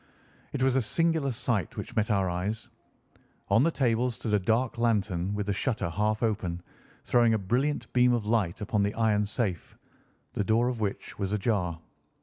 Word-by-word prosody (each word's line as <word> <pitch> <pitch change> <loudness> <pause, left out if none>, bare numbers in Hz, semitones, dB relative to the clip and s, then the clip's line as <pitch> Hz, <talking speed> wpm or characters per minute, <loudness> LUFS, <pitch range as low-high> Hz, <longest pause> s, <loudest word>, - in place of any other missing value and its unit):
It 130 - -1
was 130 -1 +3
a - - +3
singular 160 +3 +1
sight 120 - -2
which - - -6
met 110 +1 +1
our 100 -3 +2
eyes. 95 +5 -3 0.8
On 100 +3 +5
the 160 - +4
table 125 -5 +1
stood 110 -2 -4
a 105 - +4
dark 115 +5 0
lantern 100 -5 0
with 105 -1 -2
the 100 - 0
shutter 110 -5 -1
half 105 +5 0
open, 95 -6 -1 0.4
throwing 120 -2 +3
a - - +2
brilliant 125 +9 -1
beam 125 0 +5
of 120 -3 0
light 105 -6 0
upon 105 0 0
the 100 +1 0
iron 105 -2 +2
safe, 105 -6 -3 0.6
the - - 0
door 115 +4 +2
of 125 -2 -4
which 100 -1 -4
was 100 -1 -1
ajar. 95 -6 0
110 Hz, 180 wpm, -28 LUFS, 100-120 Hz, 0.8 s, On